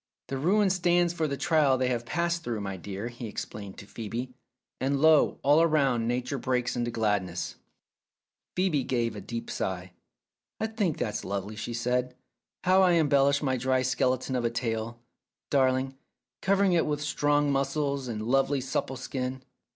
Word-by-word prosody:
"The 135 - -2
ruin 195 +6 +3
stands 175 -1 +2
for 160 -2 0
the 140 -1 -3
trial 150 -6 +3
they 130 0 +1
have 120 -1 -2
passed 170 +2 -1
through, 120 -5 -2
my 100 -1 -4
dear," 100 +5 -5
he 120 -1 -7
explained 100 -2 -7
to - - -10
Phcebe, 115 +4 -5 0.5
"and 135 +1 0
lo, 155 0 +5
all 145 +4 +5
round 135 -7 +2
Nature 125 +3 -1
breaks 125 -1 0
into 120 -1 -1
gladness! 95 -7 -1 0.5
" - - -64
Phcebe 180 -7 +1
gave 120 -3 0
a 105 - -6
deep 115 +4 -5
sigh. 90 -1 -3 0.7
"I - - 0
think 210 -8 -1
that's 105 -2 -2
lovely," 100 +2 -4
she 115 +2 -4
said. 125 +1 -1 0.5
"How 185 +1 +5
you 175 -1 +4
embellish 140 -1 +3
my 130 -2 +1
dry 130 +1 +1
skeleton 130 0 0
of 125 - 0
a 115 - +2
tale, 115 0 -3 0.5
darling, 130 -1 +2 0.5
cover 195 +1 +3
ing 190 -2 +3
it 165 -2 +2
with 150 -1 -1
strong 145 -1 +2
muscles 140 0 0
and 110 -3 -4
lovely 135 +3 +2
supple 130 0 -2
skin. 130 0 -4
130 Hz, 170 wpm, -28 LUFS, 115-150 Hz, 0.7 s, lo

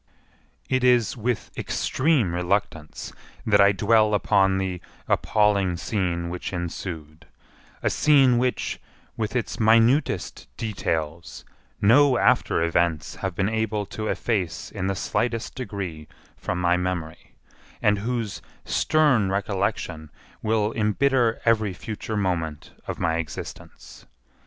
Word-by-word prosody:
It 130 -1 0
is 125 -3 +3
with 120 0 -2
extreme 130 - 0
reluctance 90 -3 -2 0.3
that 105 -2 +4
I 100 0 +6
dwell 105 +2 +3
upon 95 -2 +3
the 95 -2 -3 0.3
appalling 100 -4 +2
scene 85 -3 -2
which 90 - -5
ensued; 85 -3 -6 0.6
a - - +3
scene 135 -5 +4
which, 125 0 -1 0.3
with 110 +2 -3
its 120 - -2
minutest 115 +6 +2
details, 85 -7 -3 0.4
no 130 +5 +6
after 80 - +2
events 85 -1 0
have 95 -2 -4
been 95 - +1
able 110 -1 -1
to 110 0 -3
efface 95 -10 -2
in 95 -2 -3
the 95 - -1
slightest 115 +4 -2
degree 100 - -6 0.3
from 90 - -3
my 90 0 +2
memory, 90 -3 -4 0.4
and 105 -1 +2
whose 115 -1 -3 0.2
stern 140 -11 +2
recollection 95 -5 -2 0.3
will 110 0 +1
embitter 115 +2 +2
every 110 -4 +2
future 110 +3 -5
moment 85 -6 -2 0.2
of - - -4
my 80 0 0
existence. 85 -2 -8
100 Hz, 120 wpm, -24 LUFS, 90-115 Hz, 0.6 s, I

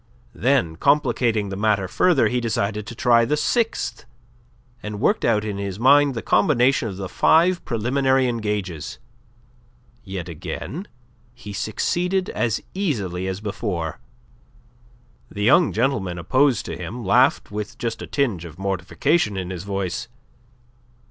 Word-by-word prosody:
Then, 120 -10 +1
complicating 120 -6 +2
the 95 - -4
matter 100 -2 +1
further, 145 - +3
he 125 +3 -1
decided 105 -2 -2
to 120 - -7
try 120 0 +4
the 150 +6 0
sixth, 185 - -1 0.8
and 105 -1 -6
worked 205 - +1
out 110 -2 +2
in 100 -2 -4
his 100 -1 -4
mind 140 +2 +5
the 115 - -4
combination 125 +2 +3
of 95 -3 -6
the 95 -1 -4
five 170 - +3
preliminary 130 +3 +1
engages. 105 -8 -3 1.1
Yet 95 -4 -6
again 135 - -6 0.5
he 105 -4 -9
succeeded 180 - -1
as 115 -2 -1
easily 100 - -2
as 95 +1 -4
before. 100 -6 -3 1.3
The 105 - -4
young 160 - +5
gentleman 110 -7 0
opposed 130 - +2
to 80 - -5
him 95 +8 -6
laughed 95 - +3
with 105 0 -5
just 115 -1 -3
a - - -6
tinge 115 - -1
of 85 -2 -10
mortification 100 - 0
in 95 -1 -4
his 90 0 -6
voice. 100 +1 -3
110 Hz, 135 wpm, -22 LUFS, 95-135 Hz, 1.3 s, mind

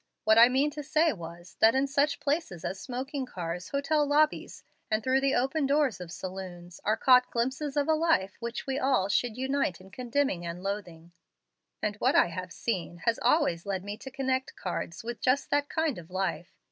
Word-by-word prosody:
What 220 +1 +5
I 235 +1 +9
meant 275 +3 +1
to 300 - -5
say 310 +2 +2
was, 170 0 -10
that 225 +3 +6
in 265 +1 +3
such 280 +1 +1
places 285 - -2
as 190 - -3
smoking 260 +1 -4
cars, 175 -2 -5
hotel 290 +2 +1
lobbies, 295 +1 +1 0.3
and 215 0 0
through 260 +2 +2
the 275 0 +2
open 270 +3 +1
doors 280 -7 +1
of 175 -2 -8
saloons, 180 -2 -8
are 215 +2 +1
caught 250 -1 +5
glimpses 265 +5 -2
of 285 - +2
a 320 - +4
life 310 - +1
which 235 0 -5
we 270 0 -1
all 260 -9 +2
should 235 +2 0
unite 265 - -1
in 190 +1 -15
condemning 255 -6 -1
and 170 +1 -6
loathing; 175 -5 -5 0.7
and 210 0 -1
what - - +2
I - - +5
have 180 +1 -6
seen 175 -6 -4
has 230 -1 +2
always 235 - +2
led 190 -2 -2
me 205 +1 -5
to 265 - -9
connect 265 0 -2
cards 175 -1 -5
with 235 0 -6
just 255 +2 +1
that 290 0 +1
kind 315 - -1
of 165 0 -13
life. 185 -1 -3
245 Hz, 195 wpm, -29 LUFS, 185-280 Hz, 0.7 s, I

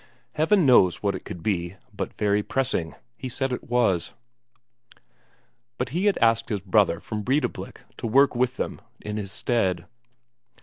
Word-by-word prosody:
Heaven 165 +3 +3
knows 105 -10 +5
what 100 -1 +1
it - - -7
could 85 - -8
be, 85 -3 -1 0.2
but - - -4
very 105 0 +2
pressing, 105 -9 -2 0.2
he 130 - -5
said 135 +2 -2
it 125 - -5
was. 115 -8 +1 1.6
But 125 - -2
he 180 +9 0
had 205 - +3
asked 115 -1 +2
his 105 - -1
brother 95 -3 +2
from 110 -1 -5
Breidablik 135 +8 -2 0.2
to - - -3
work 135 +4 +4
with 125 +1 0
them - - -4 0.2
in 105 0 -5
his 100 -2 -4
stead. 95 -9 0
115 Hz, 160 wpm, -25 LUFS, 100-130 Hz, 1.6 s, knows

